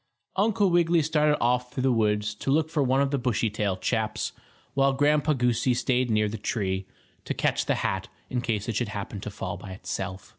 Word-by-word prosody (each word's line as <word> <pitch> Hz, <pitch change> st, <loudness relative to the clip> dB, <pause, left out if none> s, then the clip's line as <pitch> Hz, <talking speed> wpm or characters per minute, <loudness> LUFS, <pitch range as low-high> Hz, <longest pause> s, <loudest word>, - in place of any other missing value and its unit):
Uncle 205 Hz, -1 st, +2 dB
Wiggily 170 Hz, -1 st, +4 dB
started 150 Hz, -1 st, +2 dB
off 125 Hz, +1 st, +1 dB
through 130 Hz, -, -3 dB
the 130 Hz, -, +4 dB
woods 105 Hz, -2 st, +1 dB
to 105 Hz, -, -5 dB
look 155 Hz, +3 st, +2 dB
for 155 Hz, -, +1 dB
one 135 Hz, 0 st, +3 dB
of 140 Hz, -1 st, +1 dB
the 140 Hz, -, +1 dB
Bushytail 105 Hz, -5 st, 0 dB
chaps, -, -, -1 dB, 0.4 s
while 135 Hz, 0 st, +3 dB
Grandpa 150 Hz, +2 st, +3 dB
Goosey 125 Hz, -1 st, +1 dB
stayed 125 Hz, 0 st, +1 dB
near 105 Hz, -1 st, +2 dB
the 105 Hz, +1 st, -5 dB
tree, 95 Hz, -3 st, -2 dB, 0.4 s
to -, -, -3 dB
catch -, -, 0 dB
the -, -, +2 dB
hat -, -, -1 dB, 0.2 s
in 125 Hz, -, -2 dB
case 110 Hz, -4 st, -2 dB
it 115 Hz, -, -2 dB
should 120 Hz, -1 st, 0 dB
happen 105 Hz, -1 st, -5 dB
to 105 Hz, -, -5 dB
fall 100 Hz, -1 st, -5 dB
by 95 Hz, -, -8 dB
itself. 95 Hz, 0 st, -5 dB
125 Hz, 200 wpm, -27 LUFS, 105-140 Hz, 0.4 s, Wiggily